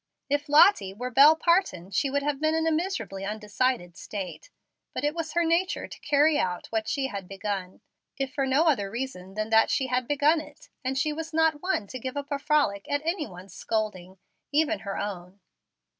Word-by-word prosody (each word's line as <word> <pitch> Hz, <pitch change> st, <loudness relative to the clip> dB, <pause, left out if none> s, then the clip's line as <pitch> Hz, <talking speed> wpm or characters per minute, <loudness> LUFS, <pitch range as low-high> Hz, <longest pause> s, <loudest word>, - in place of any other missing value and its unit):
If 290 Hz, +1 st, 0 dB
Lottie 290 Hz, -, +5 dB
were 250 Hz, +4 st, -5 dB
Bel 285 Hz, +5 st, +8 dB
Parton, 320 Hz, -, +1 dB
she 275 Hz, +8 st, +1 dB
would 280 Hz, +1 st, 0 dB
have 290 Hz, -1 st, -1 dB
been 310 Hz, 0 st, +2 dB
in 320 Hz, 0 st, +1 dB
a 325 Hz, -, +2 dB
miserably 320 Hz, -, -2 dB
undecided 210 Hz, -2 st, -1 dB
state. 205 Hz, -, -7 dB, 0.5 s
But -, -, -3 dB
it 295 Hz, +1 st, +1 dB
was 325 Hz, -2 st, -4 dB
her 345 Hz, -, +2 dB
nature 335 Hz, +3 st, 0 dB
to -, -, -11 dB
carry 295 Hz, +1 st, +3 dB
out 180 Hz, -1 st, -1 dB
what 220 Hz, -1 st, -1 dB
she 275 Hz, -2 st, -1 dB
had 200 Hz, -7 st, -5 dB
begun, 195 Hz, -1 st, -5 dB, 0.4 s
if 270 Hz, -2 st, -3 dB
for 275 Hz, -2 st, 0 dB
no 270 Hz, +4 st, +3 dB
other 255 Hz, -12 st, +2 dB
reason 200 Hz, -5 st, -6 dB
than 215 Hz, +1 st, -3 dB
that 225 Hz, 0 st, +5 dB
she 265 Hz, -, +1 dB
had 250 Hz, -1 st, +1 dB
begun 295 Hz, +2 st, +3 dB
it, 295 Hz, -1 st, -15 dB
and 260 Hz, +1 st, -1 dB
she 305 Hz, +2 st, +1 dB
was 320 Hz, +1 st, -6 dB
not 320 Hz, -2 st, +2 dB
one 365 Hz, -, 0 dB
to 255 Hz, +6 st, -7 dB
give 260 Hz, +3 st, -5 dB
up 285 Hz, +1 st, -5 dB
a 285 Hz, -, -1 dB
frolic 280 Hz, -10 st, +1 dB
at 285 Hz, +1 st, -1 dB
anyone's 220 Hz, -, -4 dB
scolding, 195 Hz, -4 st, -3 dB, 0.3 s
even 315 Hz, +2 st, +2 dB
her 200 Hz, -1 st, -5 dB
own. 190 Hz, -1 st, -5 dB
270 Hz, 200 wpm, -27 LUFS, 200-310 Hz, 0.5 s, Bel